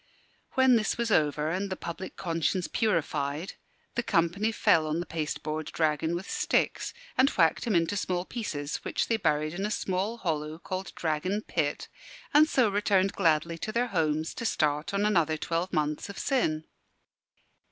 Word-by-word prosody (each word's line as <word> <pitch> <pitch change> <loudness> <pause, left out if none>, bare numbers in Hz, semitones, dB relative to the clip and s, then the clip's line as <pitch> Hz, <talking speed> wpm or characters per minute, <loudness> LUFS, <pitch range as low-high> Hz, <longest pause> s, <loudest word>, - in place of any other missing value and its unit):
When 260 -2 +5
this 215 - 0
was 235 -1 -1
over, 150 -2 +2
and 195 +3 -2
the 185 - -2
public 170 +2 -6
conscience 165 +1 0
purified, 155 -6 -1 0.4
the 235 - 0
company 195 +2 +1
fell 185 -8 +3
on 155 +2 -1
the 175 - -3
pasteboard 155 -1 -3
dragon 160 +1 0
with 180 +4 -5
sticks - - 0 0.3
and 265 +2 +6
whacked 165 - +2
him 225 -5 +1
into 170 +4 +2
small 180 -2 -1
pieces, 150 -12 -3
which - - -2
they 225 - +3
buried 155 -5 +1
in 190 +3 -3
a 210 - 0
small 200 +1 -1
hollow 155 -5 -2
called 185 +2 -5
Dragon 180 +6 -1
Pit; 150 -4 -1 0.5
and 305 +2 +6
so 255 -4 +4
returned 200 -1 +2
gladly 165 -2 +1
to 215 - -3
their 240 +2 0
homes 160 -4 0
to - - -6
start 150 -8 0
on 200 +1 +1
another 165 -7 +2
twelve 170 +4 -2
months 150 +2 -1
of 200 - -8
sin. 160 - 0
170 Hz, 165 wpm, -28 LUFS, 155-205 Hz, 0.5 s, and